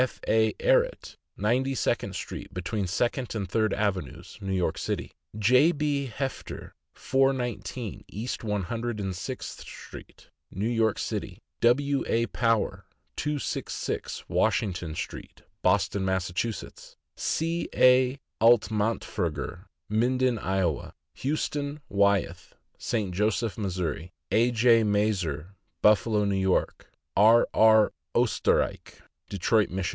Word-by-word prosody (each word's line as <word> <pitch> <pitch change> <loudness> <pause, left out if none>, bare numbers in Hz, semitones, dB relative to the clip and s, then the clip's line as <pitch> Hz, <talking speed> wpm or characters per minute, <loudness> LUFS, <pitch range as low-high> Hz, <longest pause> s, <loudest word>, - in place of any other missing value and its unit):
F. - - -17
A. 110 0 +3
Ehret, - - +1 0.2
Ninety 130 +5 +1
second - - -1
street, - - -6
between 100 -4 -2
Second 120 +6 -1
and 100 -3 -2
Third 110 +3 +1
avenues, 95 -9 -3
New 95 -1 -3
York 90 -4 0
City; - - -3 0.3
J. 125 +9 +5
B. 145 -3 -1
Hefter, 135 -1 -5 0.2
419 130 -4 -1
East 115 +4 -5
One 105 -3 -1
Hundred 115 +3 -3
and 95 -2 -3
Sixth 125 +8 -6
street, - - -12 0.2
New 100 +4 -2
York 115 -3 +1
City; - - -4 0.2
W. 140 +3 +3
A. 115 +1 +2
Power, 115 -2 0 0.3
266 150 -1 -3
Washington 90 -6 0
street, - - -7 0.2
Boston, 100 +1 +2
Mass.; 95 -1 -1 0.9
C. 165 +2 -1
A. 130 +1 +5 0.2
Altmantferger, 105 -7 +1 0.2
Minden, 125 +2 +1
Iowa; 95 -7 -1 0.2
Huston 145 0 -2
Wyeth, 100 -4 +1 0.2
St. 105 -6 -2
Joseph, 105 +3 0
Mo.; 105 -3 -2 0.6
A. 115 +2 +4
J. 115 0 +4
Maerz, 105 -1 +1 0.6
Buffalo, 105 0 +4
N. 100 -1 0
Y.; - - +4 0.5
R. 110 +4 +6
R. 110 -1 +5 0.2
Oesterrich, - - +1 0.3
Detroit, 105 +3 +2
Mich. 95 0 -2
110 Hz, 110 wpm, -27 LUFS, 100-125 Hz, 0.9 s, R